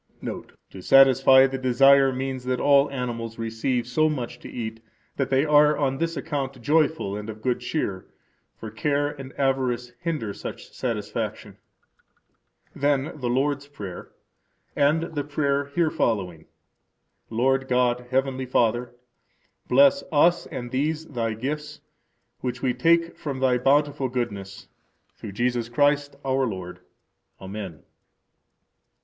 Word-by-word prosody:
Note: -, -, -7 dB, 0.2 s
To 95 Hz, -, -10 dB
satisfy 135 Hz, +2 st, +6 dB
the 135 Hz, 0 st, -3 dB
desire 135 Hz, +2 st, +5 dB
means 130 Hz, 0 st, -4 dB
that 125 Hz, 0 st, -1 dB
all 140 Hz, 0 st, +4 dB
animals 120 Hz, -4 st, -4 dB
receive 115 Hz, +2 st, -2 dB
so 155 Hz, +6 st, +2 dB
much 120 Hz, -4 st, -4 dB
to -, -, -10 dB
eat 115 Hz, -1 st, -6 dB, 0.4 s
that 135 Hz, -, -1 dB
they 135 Hz, +2 st, +2 dB
are 150 Hz, 0 st, +5 dB
on 135 Hz, -2 st, 0 dB
this 165 Hz, -1 st, -2 dB
account 135 Hz, -1 st, -4 dB
joyful 150 Hz, -5 st, +1 dB
and 105 Hz, +1 st, -6 dB
of 110 Hz, 0 st, -9 dB
good 125 Hz, -1 st, 0 dB
cheer; 120 Hz, -7 st, -3 dB, 0.5 s
for 110 Hz, -, -8 dB
care 145 Hz, +5 st, 0 dB
and 135 Hz, -2 st, -9 dB
avarice 130 Hz, -3 st, 0 dB
hinder 155 Hz, -12 st, -3 dB
such -, -, -8 dB
satisfaction. -, -, -4 dB, 1.2 s
Then 140 Hz, 0 st, +1 dB
the 125 Hz, -2 st, -2 dB
Lord's 140 Hz, +3 st, 0 dB
Prayer, 100 Hz, -11 st, -9 dB, 0.6 s
and 150 Hz, +3 st, +3 dB
the 145 Hz, -2 st, -2 dB
prayer 140 Hz, -1 st, 0 dB
here 155 Hz, +3 st, 0 dB
following: 90 Hz, -8 st, -1 dB, 0.8 s
Lord 130 Hz, +3 st, +1 dB
God, 125 Hz, -1 st, +1 dB
Heavenly 130 Hz, 0 st, -1 dB
Father, 120 Hz, 0 st, +1 dB, 0.7 s
bless 140 Hz, +2 st, +5 dB
us 170 Hz, +3 st, +3 dB
and 120 Hz, -1 st, -6 dB
these 155 Hz, +4 st, -1 dB
Thy 115 Hz, -7 st, -3 dB
gifts, 150 Hz, +5 st, -5 dB, 0.6 s
which 125 Hz, 0 st, -4 dB
we 130 Hz, -2 st, +2 dB
take 165 Hz, +6 st, +2 dB
from 140 Hz, -3 st, -4 dB
Thy 130 Hz, -1 st, +2 dB
bountiful 140 Hz, +1 st, +2 dB
goodness, 100 Hz, -5 st, -5 dB, 0.5 s
through 100 Hz, -, -9 dB
Jesus 120 Hz, +1 st, -1 dB
Christ, 145 Hz, +2 st, +1 dB
our 135 Hz, 0 st, +1 dB
Lord. 90 Hz, -4 st, -6 dB, 0.6 s
Amen. 95 Hz, -6 st, -7 dB
130 Hz, 130 wpm, -25 LUFS, 120-145 Hz, 1.2 s, satisfy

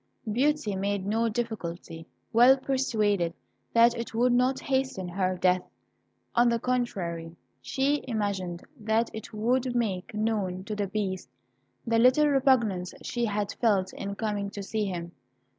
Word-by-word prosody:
Beauty 265 Hz, -3 st, +1 dB
made 200 Hz, 0 st, -1 dB
no 225 Hz, +3 st, +1 dB
difficulty, 180 Hz, -8 st, -5 dB, 0.3 s
well 245 Hz, +4 st, +7 dB
persuaded 215 Hz, -10 st, 0 dB, 0.4 s
that 235 Hz, 0 st, +5 dB
it 230 Hz, -1 st, -5 dB
would 245 Hz, +2 st, +3 dB
not 255 Hz, +2 st, +2 dB
hasten 265 Hz, -9 st, -1 dB
her 185 Hz, 0 st, -1 dB
death. 180 Hz, 0 st, +3 dB, 0.7 s
On 240 Hz, 0 st, +4 dB
the 235 Hz, -, +2 dB
contrary, 180 Hz, -10 st, -2 dB, 0.3 s
she 280 Hz, +2 st, 0 dB
imagined 200 Hz, -6 st, -2 dB, 0.2 s
that 220 Hz, +2 st, +1 dB
it 220 Hz, -, -7 dB
would 245 Hz, +3 st, 0 dB
make 205 Hz, -5 st, -1 dB
known 205 Hz, -4 st, -1 dB
to 210 Hz, +2 st, -4 dB
the 205 Hz, -1 st, -1 dB
Beast 190 Hz, -2 st, -3 dB, 0.6 s
the 230 Hz, 0 st, +2 dB
little 255 Hz, +5 st, +5 dB
repugnance 240 Hz, -10 st, +2 dB
she 240 Hz, -1 st, -1 dB
had 205 Hz, -2 st, -1 dB
felt 200 Hz, -6 st, +2 dB
in 200 Hz, 0 st, -5 dB
coming 205 Hz, -2 st, -2 dB
to 200 Hz, 0 st, -7 dB
see 215 Hz, +2 st, -1 dB
him. 175 Hz, -3 st, -4 dB
215 Hz, 140 wpm, -28 LUFS, 190-240 Hz, 0.7 s, well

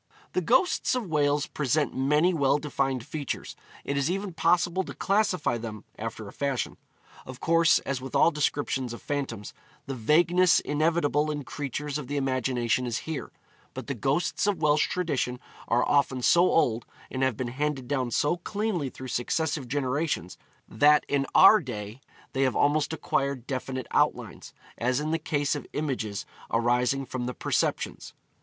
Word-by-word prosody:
The 185 Hz, -, +1 dB
ghosts 260 Hz, -, +2 dB
of 250 Hz, -3 st, -2 dB
Wales 145 Hz, -1 st, +2 dB
present 150 Hz, 0 st, -1 dB
many 150 Hz, +7 st, +3 dB
well 140 Hz, -3 st, +3 dB
defined 135 Hz, -4 st, -2 dB
features. 145 Hz, -3 st, -5 dB, 0.3 s
It 140 Hz, -, -1 dB
is 140 Hz, +2 st, +1 dB
even 195 Hz, 0 st, -3 dB
possible 175 Hz, +2 st, +2 dB
to -, -, -8 dB
classify 195 Hz, -, +1 dB
them, 110 Hz, -2 st, -7 dB, 0.2 s
after 110 Hz, -1 st, -5 dB
a 100 Hz, -, -10 dB
fashion. 140 Hz, -3 st, -2 dB, 0.5 s
Of 130 Hz, 0 st, -10 dB
course, 165 Hz, 0 st, +4 dB
as 135 Hz, -2 st, -2 dB
with 130 Hz, -, -7 dB
all 170 Hz, -, +5 dB
descriptions 140 Hz, -4 st, -1 dB
of 120 Hz, -, -9 dB
phantoms, 130 Hz, -8 st, -4 dB, 0.3 s
the 135 Hz, -, -4 dB
vagueness 170 Hz, +8 st, +4 dB
inevitable 155 Hz, 0 st, +1 dB
in 150 Hz, -1 st, -3 dB
creatures 145 Hz, +2 st, -4 dB
of 140 Hz, -, -7 dB
the 145 Hz, +2 st, -2 dB
imagination 130 Hz, -3 st, 0 dB
is 120 Hz, 0 st, -1 dB
here; 160 Hz, -2 st, -5 dB, 0.4 s
but -, -, -6 dB
the 140 Hz, -, -3 dB
ghosts 140 Hz, -, 0 dB
of 205 Hz, -3 st, +1 dB
Welsh 150 Hz, 0 st, +3 dB
tradition 140 Hz, -8 st, -1 dB, 0.3 s
are 120 Hz, +1 st, +2 dB
often 135 Hz, -3 st, +2 dB
so 175 Hz, +6 st, +5 dB
old, 120 Hz, -7 st, +2 dB, 0.3 s
and 130 Hz, -, -3 dB
have 130 Hz, -4 st, +1 dB
been 125 Hz, -2 st, -3 dB
handed 135 Hz, 0 st, -2 dB
down 130 Hz, -2 st, -1 dB
so 145 Hz, +8 st, +1 dB
cleanly 195 Hz, -5 st, -2 dB
through 130 Hz, 0 st, -9 dB
successive 145 Hz, +3 st, -1 dB
generations, 135 Hz, -, -1 dB, 0.3 s
that 150 Hz, +6 st, +4 dB
in 140 Hz, -1 st, +1 dB
our 210 Hz, +3 st, +9 dB
day 110 Hz, -, -7 dB, 0.3 s
they 135 Hz, -, 0 dB
have 130 Hz, -2 st, +2 dB
almost 145 Hz, +1 st, +2 dB
acquired 140 Hz, -5 st, -1 dB
definite 130 Hz, -1 st, -4 dB
outlines, -, -, 0 dB, 0.3 s
as 125 Hz, +3 st, +1 dB
in 155 Hz, +1 st, -2 dB
the 165 Hz, -, 0 dB
case 145 Hz, -2 st, 0 dB
of 145 Hz, -, -5 dB
images 125 Hz, -9 st, -3 dB, 0.2 s
arising 125 Hz, +3 st, +1 dB
from 125 Hz, -1 st, -4 dB
the 125 Hz, -, -4 dB
perceptions. -, -, -2 dB
140 Hz, 165 wpm, -27 LUFS, 125-155 Hz, 0.5 s, our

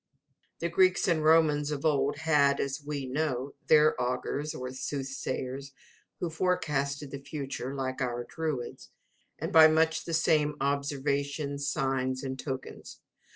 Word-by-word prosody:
The 170 Hz, -, 0 dB
Greeks 185 Hz, +3 st, +3 dB
and 165 Hz, -4 st, +2 dB
Romans 155 Hz, -2 st, +4 dB
of 150 Hz, 0 st, -3 dB
old 145 Hz, -2 st, +2 dB
had 145 Hz, -3 st, +3 dB
as 140 Hz, +1 st, -2 dB
we 145 Hz, -2 st, -4 dB
know 135 Hz, -1 st, -2 dB
their 155 Hz, 0 st, +6 dB
augurs 145 Hz, +5 st, -2 dB
or 125 Hz, -2 st, -5 dB
soothsayers, 135 Hz, 0 st, -4 dB, 0.5 s
who 170 Hz, -, -2 dB
forecasted 150 Hz, -5 st, -1 dB
the 140 Hz, -, -5 dB
future, 140 Hz, -2 st, -5 dB
like 130 Hz, 0 st, -3 dB
our 120 Hz, -1 st, -1 dB
druids, 150 Hz, -7 st, -4 dB, 0.5 s
and -, -, -4 dB
by 160 Hz, -1 st, +10 dB
much 160 Hz, +1 st, +2 dB
the 165 Hz, -, -1 dB
same 150 Hz, -2 st, +2 dB
observations, 140 Hz, +1 st, -1 dB
signs, 130 Hz, -1 st, -1 dB
and 130 Hz, -1 st, -4 dB
tokens. 130 Hz, -2 st, -6 dB
140 Hz, 135 wpm, -29 LUFS, 135-155 Hz, 0.5 s, by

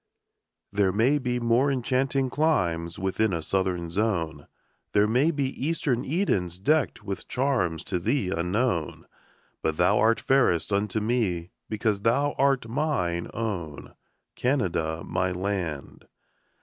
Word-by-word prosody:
There 100 Hz, -2 st, +3 dB
may 120 Hz, +9 st, +3 dB
be 125 Hz, -2 st, -1 dB
more 120 Hz, +4 st, +3 dB
enchanting 130 Hz, +1 st, 0 dB
climes 85 Hz, -, 0 dB
Within 95 Hz, +2 st, 0 dB
a 85 Hz, -, -1 dB
southern 90 Hz, -3 st, -1 dB
zone; 85 Hz, -8 st, -1 dB, 0.5 s
There 105 Hz, 0 st, +5 dB
may 125 Hz, +8 st, +3 dB
be 140 Hz, -5 st, 0 dB
eastern 140 Hz, -5 st, 0 dB
Edens 100 Hz, -, 0 dB
deckt 150 Hz, +10 st, +1 dB
With 100 Hz, -2 st, -5 dB
charms 95 Hz, -, 0 dB
to 90 Hz, -2 st, -2 dB
thee 105 Hz, 0 st, 0 dB
unknown; 90 Hz, -, -1 dB, 0.6 s
But 80 Hz, -1 st, -1 dB
thou 90 Hz, +4 st, +3 dB
art 115 Hz, +1 st, +3 dB
fairest 120 Hz, -9 st, +2 dB
unto 105 Hz, +1 st, 0 dB
me, 105 Hz, -7 st, -1 dB, 0.2 s
Because 105 Hz, -2 st, 0 dB
thou 140 Hz, +7 st, +2 dB
art 135 Hz, -3 st, +2 dB
mine 115 Hz, -, -1 dB
own, 95 Hz, -10 st, -4 dB, 0.4 s
Canada, 85 Hz, -, 0 dB
my 90 Hz, +1 st, 0 dB
land. 90 Hz, -6 st, -4 dB
105 Hz, 125 wpm, -26 LUFS, 90-130 Hz, 0.6 s, There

